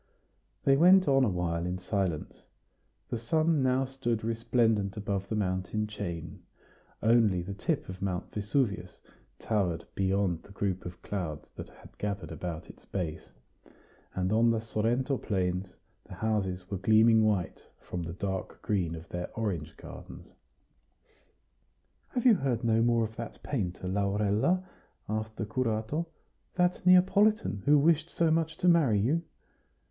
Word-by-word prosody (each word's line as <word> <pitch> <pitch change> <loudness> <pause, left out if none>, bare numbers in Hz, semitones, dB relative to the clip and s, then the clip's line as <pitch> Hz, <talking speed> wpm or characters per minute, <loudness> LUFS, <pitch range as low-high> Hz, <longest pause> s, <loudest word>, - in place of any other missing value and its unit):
They 135 0 +4
went 185 +4 +6
on 135 -1 +4
a 120 - +3
while 85 -2 -1
in 90 +1 -2
silence. 90 -4 -3 0.6
The 120 - -2
sun 155 +6 +2
now 130 +1 +2
stood 125 -4 -2
resplendent 110 -3 +1
above 100 -1 -3
the 110 - -1
mountain 95 +1 -1
chain; 85 -6 -6 0.6
only 110 -6 +4
the 100 +3 -5
tip 155 - -2
of 95 0 -8
Mount 95 -2 -3
Vesuvius 105 -4 -1 0.4
towered 95 -7 -1
beyond 95 -3 0
the 100 - -15
group 95 -3 -2
of 90 - -11
clouds 80 -7 -5
that - - -9
had - - -17
gathered 100 -6 -3
about 80 0 -5
its - - -14
base; 85 -5 -4 0.9
and 95 +2 0
on 115 +1 +4
the 115 -1 +2
Sorrento 115 +5 0
plains 90 -2 -2 0.3
the - - -10
houses 95 -5 -1
were 100 - -2
gleaming 110 +2 +5
white 100 -5 -1
from 90 - -5
the 85 0 -5
dark 95 -1 -4
green 90 -7 0
of 80 +1 -10
their 90 0 -4
orange 95 -9 -3
gardens. - - -11 1.7
"Have 245 - -3
you 245 - +8
heard 135 - 0
no 115 -1 +3
more 115 0 +3
of 110 0 -5
that 115 - -7
painter, 95 -9 -3
Laurella?" 105 - +1 0.4
asked 110 +1 -3
the 110 - -3
curato 120 +7 -1 0.5
"that 180 0 +1
Neapolitan, 190 - +4
who 145 +1 +6
wished 160 +2 +3
so 165 -2 +1
much 160 0 0
to 180 - 0
marry 155 -11 +5
you?" 140 +11 +1
105 Hz, 145 wpm, -29 LUFS, 95-130 Hz, 1.7 s, you